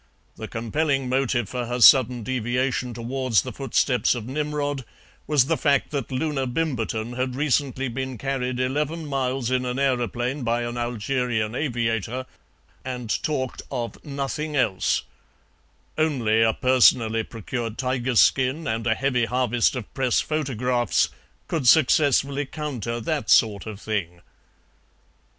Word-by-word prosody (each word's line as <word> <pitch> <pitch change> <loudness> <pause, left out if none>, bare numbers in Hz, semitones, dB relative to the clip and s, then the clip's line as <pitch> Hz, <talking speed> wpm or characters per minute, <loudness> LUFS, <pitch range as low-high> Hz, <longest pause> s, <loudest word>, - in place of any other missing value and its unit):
The - - -7
compelling 135 +3 -1
motive 130 -3 +1
for 125 +2 -4
her 120 +1 -2
sudden 125 -1 +6
deviation 125 +1 -1
towards 120 - 0
the - - -6
footsteps - - +1
of 115 -3 -5
Nimrod 145 0 -2 0.4
was 145 -4 +4
the 160 +3 0
fact 140 -4 +1
that 140 -6 -3
Loona 135 0 -1
Bimberton 120 -5 -2
had 130 0 -1
recently 135 -2 0
been 130 +1 -4
carried 130 -1 -2
eleven 150 +5 -1
miles 130 -3 -1
in 130 0 +1
an 125 0 -3
aeroplane 125 0 -1
by 120 0 0
an 120 0 -4
Algerian 120 -1 -1
aviator, 120 -2 -2 0.6
and 125 -3 -3
talked 130 -4 -2
of 120 -1 -5
nothing 145 +1 -4
else; 110 -9 +1 1.0
only 120 -8 +2
a 115 0 +5
personally 120 -3 +4
procured 115 +1 -5
tiger 130 -1 -1
skin 130 +7 +3
and 115 -3 -2
a 110 - +3
heavy 125 -2 +1
harvest 125 +1 +1
of 120 -5 -7
Press 130 -3 +1
photographs 125 -6 0 0.4
could 150 -7 -1
successfully 140 -1 +4
counter 125 -7 -4
that 150 +5 -2
sort 105 -2 +4
of 105 -2 -7
thing. 90 -6 -3
125 Hz, 130 wpm, -24 LUFS, 120-135 Hz, 1.0 s, sudden